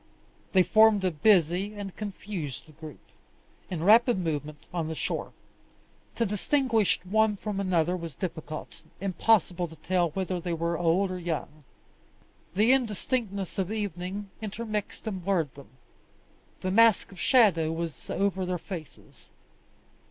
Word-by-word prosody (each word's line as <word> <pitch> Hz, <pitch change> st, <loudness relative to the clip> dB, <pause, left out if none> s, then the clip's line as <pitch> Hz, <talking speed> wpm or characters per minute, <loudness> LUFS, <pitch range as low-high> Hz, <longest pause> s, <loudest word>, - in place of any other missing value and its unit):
They 185 Hz, -1 st, +6 dB
formed 215 Hz, -1 st, +5 dB
a 185 Hz, -, +2 dB
busy 180 Hz, +3 st, +3 dB
and 200 Hz, -2 st, -6 dB
confused 195 Hz, -9 st, -5 dB
group, 155 Hz, -4 st, -10 dB, 0.7 s
in 165 Hz, -3 st, -3 dB
rapid 230 Hz, +4 st, +6 dB
movement 150 Hz, -4 st, -3 dB
on 170 Hz, -3 st, -1 dB
the 160 Hz, -, -4 dB
shore. -, -, -3 dB, 0.8 s
To 230 Hz, -, +1 dB
distinguish 225 Hz, +1 st, +1 dB
one 215 Hz, +2 st, +2 dB
from 205 Hz, -1 st, -4 dB
another 180 Hz, -3 st, +1 dB
was 165 Hz, -5 st, -6 dB
difficult; 155 Hz, -3 st, -6 dB, 0.2 s
impossible 185 Hz, -2 st, +2 dB
to 160 Hz, -, -13 dB
tell 175 Hz, +2 st, 0 dB
whether 185 Hz, +2 st, -2 dB
they 175 Hz, 0 st, -3 dB
were 170 Hz, +1 st, -1 dB
old 175 Hz, +3 st, +2 dB
or 185 Hz, -, -4 dB
young. 155 Hz, -3 st, -4 dB, 0.9 s
The 220 Hz, +6 st, +5 dB
indistinctness 215 Hz, -5 st, -1 dB
of 190 Hz, +1 st, -1 dB
evening 200 Hz, -1 st, -4 dB
intermixed 215 Hz, 0 st, -4 dB
and 190 Hz, -5 st, -4 dB
blurred 170 Hz, -7 st, 0 dB
them; 140 Hz, -, -13 dB, 0.9 s
the 185 Hz, -, -1 dB
mask 225 Hz, 0 st, +5 dB
of 190 Hz, -, -12 dB
shadow 185 Hz, -, +4 dB
was 165 Hz, -5 st, -5 dB
over 195 Hz, -1 st, 0 dB
their 180 Hz, 0 st, -1 dB
faces. 170 Hz, -3 st, -10 dB
185 Hz, 135 wpm, -28 LUFS, 170-210 Hz, 0.9 s, They